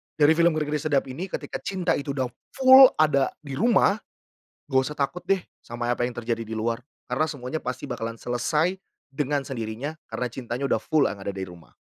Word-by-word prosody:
dari 150 0 +5
film 170 -1 +4
Ngeri 155 -1 -1
Ngeri - - 0
Sedap 145 -2 +1
ini 150 +9 -5
ketika - - -5
cinta 185 -3 0
itu 140 0 -3
sudah 130 -2 0 0.3
full 265 0 +9
ada 150 -3 +3
di 140 -2 -6
rumah, 215 - +4 0.7
enggak 130 -2 +3
usah - - -12
takut 145 +5 -2
deh 195 -1 +3 0.2
sama 120 0 -5
apa 120 - 0
yang 125 - -10
terjadi 115 -1 -2
di 110 - -9
luar 115 +2 -1 0.3
karena 125 +5 +1
semuanya 145 +1 -4
pasti 125 +2 -4
bakalan 115 -2 -4
selesai 150 +9 0 0.4
dengan 145 +1 0
sendirinya 125 +4 -5
karena 125 - -3
cintanya 125 +1 -4
udah - - +1
full 155 -3 +2
yang 100 -1 -7
ada 100 - -4
dari 95 -1 -4
rumah. 85 -2 -15
135 Hz, 195 wpm, -25 LUFS, 120-155 Hz, 0.7 s, full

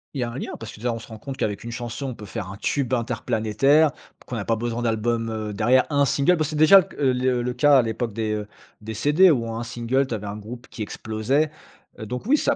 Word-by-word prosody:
Il 135 - -2
y - - +2
a 120 - -3
un 120 - -7
lien - - -5
parce 115 - -7
que, - - -12
déjà, 120 +2 -1
on 115 - -3
se - - -12
rend 110 -2 -10
compte 135 +3 -7
qu'avec 105 -1 -2
une 120 - -6
chanson, 120 +3 -5
on 130 - -5
peut 105 - -10
faire 100 -2 -6
un 100 - -9
tube 130 +4 -1
interplanétaire, 120 +5 +2 0.3
qu'on 125 - -5
n'a 105 -3 -3
pas 115 - +1
besoin 120 +1 -3
d'album, 115 0 0
heu, 110 -1 -4
derrière, 120 +5 +3
un 145 -1 +3
single. 140 +6 +3
Parce 155 -3 -1
que 155 - -4
déjà 155 +6 +8 0.2
le 135 -3 +2
c 125 -1 +1
le 125 - -1
cas 140 +3 +5
à - - +6
l'époque 115 0 -3
des, 110 0 -1
heu, 105 -1 -3 0.3
des 110 +1 -6
CD, 150 - +5
où 115 -7 +1
un 115 +1 -3
single, 120 +3 0
tu 120 - -2
avais 105 -1 -6
un 100 +1 -5
groupe 120 +4 -9
qui 115 - -9
explosait. 110 +8 -1 0.5
Donc 125 - -5
oui, 280 +6 +4
ça - - +1
120 Hz, 265 wpm, -24 LUFS, 110-135 Hz, 0.5 s, déjà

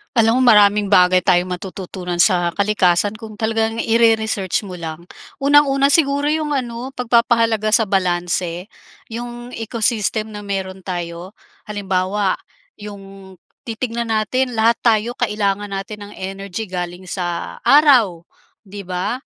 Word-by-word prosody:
Alam 230 +3 +3
mo 240 - +7
maraming 205 -1 +4
bagay 180 -1 +5
tayong 180 +1 +2
matututunan 180 -1 -6
sa 175 -3 +3
kalikasan 200 0 +2
kung 215 -1 -11
talagang 225 0 -1
ire-research 220 -4 +1
mo 180 - -7
lang. 165 0 -8 0.3
Unang-una 280 -1 +4
siguro 285 -1 +2
yung 305 0 -1
ano, 250 -1 -3
pagpapahalaga 230 -3 +1
sa 220 0 +3
balanse. 180 -1 -1 0.4
'Yong 240 +1 -7
ecosystem 220 -1 -1
na 210 -1 -9
meron 190 -2 -5
tayo, 175 0 -5 0.3
halimbawa 195 -1 -1 0.4
'yong 195 -2 -12 0.2
titignan 230 0 -4
natin, 250 +4 0
lahat 230 +1 +3
tayo 230 +1 +2
kailangan 205 -3 -1
natin 200 +2 -6
ng 205 - -11
energy 195 +2 -5
galing 180 0 -6
sa 175 -2 -4
araw, 245 - +4 0.4
'di 200 +1 -8
ba? 185 +5 -3
210 Hz, 125 wpm, -19 LUFS, 185-230 Hz, 0.4 s, mo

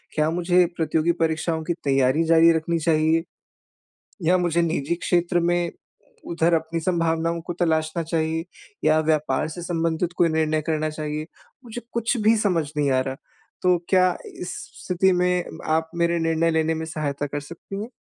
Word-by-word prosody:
क्या 155 0 +2
मुझे 180 +1 +3
प्रतियोगी 160 +1 +1
परीक्षाओं 160 0 -1
की 170 - -1
तैयारी 135 +3 +3
जारी 165 0 +6
रखनी 165 +1 -1
चाहिए। 160 0 +2 1.0
या 185 - +5
मुझे 170 -1 +1
निजी 165 -1 -1
क्षेत्र 175 0 +1
में 175 0 +1 0.6
उधर 170 0 +1
अपनी 160 +1 0
संभावनाओं 165 -1 0
को 175 +1 -5
तलाशना 160 0 0
चाहिए 160 0 -1 0.4
या 155 0 +4
व्यापार 150 -4 0
से 175 +2 -7
संबंधित 165 0 -1
कोई 170 - +4
निर्णय 155 -1 +1
करना 155 -1 -1
चाहिए, 155 0 -4 0.4
मुझे 240 +1 -7
कुछ 235 +2 0
भी 220 +2 +5
समझ 180 -8 +1
नहीं 145 -2 +2
आ 130 - +3
रहा, 130 0 -4 0.5
तो 180 -1 +4
क्या 185 -1 +3 0.2
इस 180 - -4 0.3
स्थिति 185 +1 +2
में 180 0 +1 0.3
आप 160 0 -1
मेरे 170 0 +1
निर्णय 165 0 +1
लेने 160 0 +1
में 160 - -4
सहायता 145 -3 -3
कर 145 +1 -4
सकती 170 +6 -8
हैं? 235 - -8
165 Hz, 165 wpm, -23 LUFS, 155-175 Hz, 1.0 s, जारी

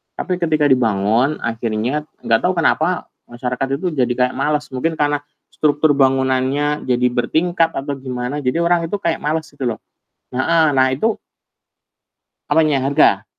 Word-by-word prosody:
tapi 180 -2 -3
ketika 155 -3 +1
dibangun 115 +3 +2
akhirnya, 115 +6 -2 0.2
nggak 115 0 +3
tau 180 0 0
kenapa, 170 +1 0 0.2
masyarakat 125 +2 -3
itu 175 +5 -2
kayak 125 -3 +1
males, 150 0 -1
mungkin 160 +6 -1
karena 145 -1 +1 0.3
struktur 150 0 +2
bangunannya 135 +2 +1
jadi 125 0 +2
bertingkat 165 +6 0
atau 140 +1 -3
gimana, 130 +1 -4
jadi 145 +5 0
orang 170 -1 +2
itu 185 - -2
kayak 165 - 0
males 155 +1 -2
gitu 140 -3 -4
loh. 110 -3 -3 0.5
Heeh, 160 +6 +2
nah 130 0 +4
itu 220 - 0 1.3
Apanya? 150 -2 +3
Harga? 140 +2 +3
140 Hz, 140 wpm, -19 LUFS, 125-160 Hz, 1.3 s, nah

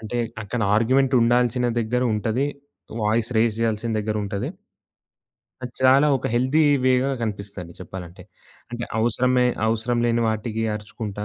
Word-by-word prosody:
అంటే 115 +2 -4 0.2
అక్కడ 115 +3 -4 0.2
ఆర్గ్యుమెంట్ 130 +4 +2
ఉండాల్సిన 120 +1 +2
దగ్గర 120 +2 -1
ఉంటది. 110 +5 0 0.6
Voice 110 +2 +1
raise 110 -1 +2
జేయాల్సిన 115 0 -1
దగ్గరుంటది. 105 -2 -2 1.1
అది 125 -1 -6
చాలా 130 +3 +5
ఒక 130 - -4
హెల్తీ 130 +6 +2 0.2
వే‌గా 130 +1 +3
కనిపిస్తదండి 100 -5 -5
చెప్పాలంటే. 90 0 -9 0.5
అంటే 120 0 -4
అవసరమే, 125 +2 +2 0.2
అవసరం 115 +2 0
లేని 120 0 +1
వాటికి 110 +1 -2
అరుచుకుంటా 105 -1 -6
115 Hz, 125 wpm, -23 LUFS, 105-125 Hz, 1.1 s, చాలా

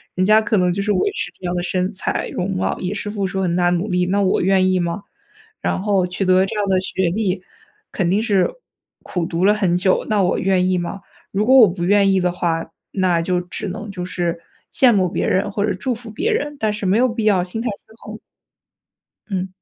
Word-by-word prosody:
人 185 - +1
家 215 +2 +5
可 215 -1 0
能 180 -1 +2
就 200 - -2
是 210 - 0
维 185 -3 +2
持 180 - -4
这 185 - -9
样 175 - -1
的 175 - -1
身 185 0 -1
材 190 - -2
容 185 +2 -2
貌， 185 0 -1
也 185 +2 -3
是 205 - -4
付 205 -2 -2
出 190 +1 -2
很 175 -2 0
大 175 0 +2
的 180 - +2
努 195 +5 -3
力， 180 -1 +1
那 200 +2 +1
我 190 - +2
愿 185 0 +3
意 185 - +2
吗？ 175 +3 -2 0.6
然 - - -1
后 195 -3 +1
取 185 +2 -3
得 185 +1 +4
这 215 - -5
样 205 - +1
的 185 - +3
学 185 -1 -1
历， 190 -1 -1 0.5
肯 175 -3 -1
定 205 +4 +1
是 200 -5 +2 0.5
苦 175 -3 -3
读 170 +1 -2
了 205 - +5
很 195 -5 +1
久， 185 +1 +1
那 205 -3 +2
我 180 - +1
愿 185 -1 +2
意 185 - +2
吗？ 180 +3 -4 0.3
如 205 +2 0
果 260 - +4
我 230 - +9
不 175 -1 -4
愿 200 +1 +4
意 190 - +2
的 180 0 +1
话， 165 -2 -2 0.2
那 180 -3 +1
就 180 +1 0
只 180 +3 -6
能 205 +2 -6
就 180 -2 -5
是 175 -2 -2 0.3
羡 250 -3 +5
慕 185 -3 +2
别 - - -1
人 200 +2 +1
或 200 0 0
者 215 - 0
祝 245 +7 -2
福 230 0 -9
别 360 - -1
人， 295 -9 -2
但 215 -3 0
是 210 -1 -5
没 190 +4 +3
有 255 +1 +3
必 225 -1 -3
要 195 -4 +3
心 205 +5 -5
态 245 - -3 0.2
失 220 - -20
衡。 215 +1 -8 1.1
嗯。 190 -2 -2
190 Hz, 265 characters per minute, -20 LUFS, 180-210 Hz, 1.1 s, 我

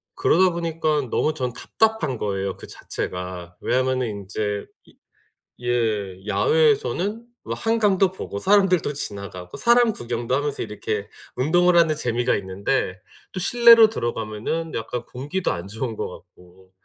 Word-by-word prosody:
그러다 185 +2 +4
보니깐 160 -5 -1
너무 155 - +1
전 130 -5 -2
답답한 200 - 0
거예요 95 -2 -2
그 - - -11
자체가. 90 -1 -6
왜냐하면은 130 0 +1
인제 105 0 -3 0.2
이 - - -22 0.7
예 110 -6 -1
야외에서는 425 - +2 0.2
뭐 - - -3
한강도 205 -5 +2
보고 100 - -6
사람들도 190 - +3
지나가고 100 -8 -7
사람 235 -1 +4
구경도 120 - -2
하면서 145 0 -2
이렇게 105 -1 -4 0.3
운동을 175 +6 +3
하는 165 -2 +4
재미가 120 -4 0
있는데 95 0 -2 0.3
또 185 - -4
실내로 230 +2 +7
들어가면은 120 - -3
약간 115 +2 -4
공기도 145 +9 -3
안 85 +2 -6
좋은 110 +2 -4
것 - - -3
같고 90 +1 -16
130 Hz, 315 characters per minute, -23 LUFS, -, 0.7 s, 실내로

